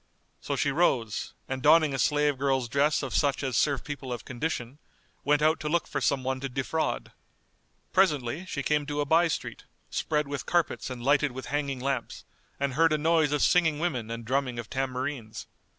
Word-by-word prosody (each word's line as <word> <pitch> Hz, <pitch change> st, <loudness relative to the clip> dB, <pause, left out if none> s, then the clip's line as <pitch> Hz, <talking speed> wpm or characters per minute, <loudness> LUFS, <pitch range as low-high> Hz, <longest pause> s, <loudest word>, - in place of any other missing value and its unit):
So -, -, -3 dB
she 140 Hz, -, +1 dB
rose, 130 Hz, -8 st, 0 dB
and 130 Hz, 0 st, -3 dB
donning 155 Hz, 0 st, +5 dB
a 135 Hz, -, -2 dB
slave 145 Hz, -2 st, +2 dB
girl's 135 Hz, -3 st, +1 dB
dress 145 Hz, +5 st, +2 dB
of 130 Hz, -4 st, -4 dB
such 140 Hz, +3 st, +1 dB
as 130 Hz, -3 st, -1 dB
serve 140 Hz, 0 st, +2 dB
people 140 Hz, -3 st, -6 dB
of 120 Hz, -, -5 dB
condition, 130 Hz, 0 st, -4 dB, 0.4 s
went 150 Hz, +1 st, +2 dB
out 155 Hz, +1 st, +3 dB
to 150 Hz, -, -3 dB
look 170 Hz, +2 st, +1 dB
for 140 Hz, -, -3 dB
some 135 Hz, 0 st, +1 dB
one 130 Hz, 0 st, -1 dB
to 135 Hz, +1 st, -4 dB
defraud. 135 Hz, +5 st, -2 dB, 0.8 s
Presently 155 Hz, -3 st, +1 dB
she 140 Hz, -6 st, -3 dB
came 150 Hz, +1 st, +1 dB
to 145 Hz, 0 st, -1 dB
a -, -, 0 dB
by 165 Hz, +4 st, +4 dB
street, 160 Hz, -, -4 dB, 0.3 s
spread 150 Hz, -2 st, 0 dB
with 140 Hz, -1 st, -5 dB
carpets 175 Hz, -5 st, 0 dB
and 125 Hz, -2 st, -6 dB
lighted 140 Hz, 0 st, +3 dB
with 130 Hz, -1 st, -7 dB
hanging 140 Hz, -3 st, -1 dB
lamps, 130 Hz, -2 st, -3 dB, 0.3 s
and 140 Hz, -1 st, -1 dB
heard 165 Hz, +3 st, +4 dB
a -, -, +3 dB
noise 160 Hz, -1 st, +2 dB
of 150 Hz, -1 st, +1 dB
singing 160 Hz, -4 st, +3 dB
women 130 Hz, -9 st, -2 dB
and 115 Hz, 0 st, -5 dB
drumming 130 Hz, 0 st, -1 dB
of 120 Hz, -2 st, -6 dB
tambourines. 130 Hz, -3 st, -3 dB
140 Hz, 195 wpm, -28 LUFS, 130-150 Hz, 0.8 s, donning